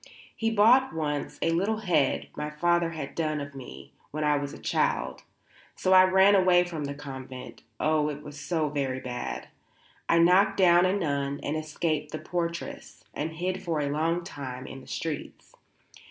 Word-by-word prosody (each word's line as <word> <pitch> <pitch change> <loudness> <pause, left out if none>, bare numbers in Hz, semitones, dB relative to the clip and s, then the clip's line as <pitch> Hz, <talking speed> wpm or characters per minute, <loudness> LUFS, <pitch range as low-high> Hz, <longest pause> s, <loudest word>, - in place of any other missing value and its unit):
He 225 - 0
bought 230 +4 +5
once 150 -2 -2
a 165 - +2
little 195 +6 +1
head 170 -9 +1
my 150 0 -3
father 170 +2 +1
had 155 -4 -6
done 155 -2 -1
of 140 0 -6
me 70 - -10 0.2
when 155 +1 -3
I 150 0 +3
was 140 -1 -2
a - - -9
child. - - -1 0.5
So 185 - +2
I 185 0 +8
ran 190 +2 +5
away 185 -2 +5
from 165 -4 -5
the 140 0 -4
convent 130 -3 -9 0.2
oh, 155 -1 +2
it 150 0 -6
was 150 0 -9
very 145 -6 0
bad; 125 -1 -5 0.6
I 165 - +5
knocked 185 +4 +5
down 180 -1 +6
a 185 - +1
nun 140 -6 -1
and 145 - -2
escaped 155 -1 -2
the - - -2
portress, 170 0 -5
and 160 +2 -3
hid 185 +3 -2
for 170 -4 -1
a 140 -1 -1
long 165 +4 0
time 130 -6 -7
in 135 - -9
the - - -16
streets. 160 -3 -5
155 Hz, 175 wpm, -27 LUFS, 145-180 Hz, 0.6 s, I